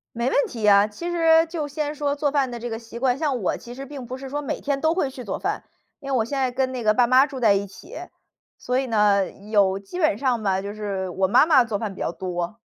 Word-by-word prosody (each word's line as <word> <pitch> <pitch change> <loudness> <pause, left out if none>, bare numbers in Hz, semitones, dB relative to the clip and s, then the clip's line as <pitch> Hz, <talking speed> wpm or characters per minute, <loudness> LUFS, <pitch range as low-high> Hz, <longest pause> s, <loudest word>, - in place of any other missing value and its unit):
没 235 +2 0
问 285 - +2
题 220 -3 -1
啊。 200 0 +6
其 340 +12 -6
实 330 -1 +4
就 320 -2 -4
先 295 +1 -3
说 285 -1 -1
做 290 -1 0
饭 275 -3 +1
的 240 - -6
这 240 +1 -5
个 225 - -4
习 230 0 -10
惯， 255 -1 +1
像 275 -6 -1
我 185 - 0
其 240 - -10
实 275 +2 -8
并 270 -3 -8
不 255 +2 -6
是 270 0 -8
说 290 +2 -3
每 280 - -4
天 280 -1 -1
都 320 +1 +2
会 290 -7 0
去 255 -1 -9
做 200 - -4
饭， - - -3 0.4
因 275 - -7
为 265 - +2
我 225 - +1
现 275 +4 -4
在 260 -1 +1
跟 260 +1 -1
那 250 - -4
个 215 -1 +4
爸 245 +1 +4
妈 255 +3 +5
住 270 -3 -8
在 215 -4 +5
一 200 +1 -1
起， 335 - -13 0.6
所 250 +1 -1
以 265 - -1
呢， 205 -4 +2
有 200 -2 +1
基 200 - -9
本 310 - +2
上 250 -4 0
吧， 190 -2 +1
就 200 +1 -6
是 200 -3 -3
我 190 +2 +1
妈 205 - +5
妈 280 -6 +5
做 220 -3 -3
饭 210 -3 -4
比 - - -12
较 - - -1
多。 180 +3 -4
245 Hz, 295 characters per minute, -23 LUFS, 205-280 Hz, 0.6 s, 啊